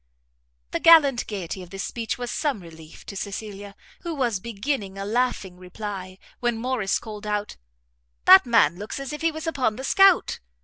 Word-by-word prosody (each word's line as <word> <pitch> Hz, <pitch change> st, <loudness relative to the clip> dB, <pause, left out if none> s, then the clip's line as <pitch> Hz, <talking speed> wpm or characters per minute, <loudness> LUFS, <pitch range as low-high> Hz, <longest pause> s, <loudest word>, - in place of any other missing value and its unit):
The -, -, -1 dB
gallant 290 Hz, -7 st, +6 dB
gaiety 190 Hz, -3 st, -5 dB
of 180 Hz, -, -11 dB
this 195 Hz, +2 st, -5 dB
speech 230 Hz, -2 st, -4 dB
was 245 Hz, -1 st, -4 dB
some 290 Hz, -8 st, -1 dB
relief 160 Hz, -2 st, -13 dB
to 200 Hz, -, -8 dB
Cecilia, 200 Hz, 0 st, -6 dB, 0.2 s
who 340 Hz, -2 st, -5 dB
was 240 Hz, -8 st, 0 dB
beginning 205 Hz, -1 st, -4 dB
a 195 Hz, -, -4 dB
laughing 215 Hz, -5 st, -1 dB
reply, 185 Hz, 0 st, -7 dB, 0.2 s
when 240 Hz, -2 st, 0 dB
Morrice 230 Hz, -4 st, -1 dB
called 210 Hz, -1 st, -8 dB
out, 210 Hz, 0 st, -3 dB, 0.7 s
"That 190 Hz, -, +8 dB
man 200 Hz, -9 st, +4 dB
looks 210 Hz, +6 st, -6 dB
as 275 Hz, +1 st, -6 dB
if 300 Hz, -, -6 dB
he 330 Hz, 0 st, +2 dB
was 315 Hz, +1 st, -7 dB
upon 265 Hz, -9 st, 0 dB
the 260 Hz, -, -7 dB
scout." 390 Hz, +5 st, +4 dB
215 Hz, 175 wpm, -24 LUFS, 195-260 Hz, 0.7 s, That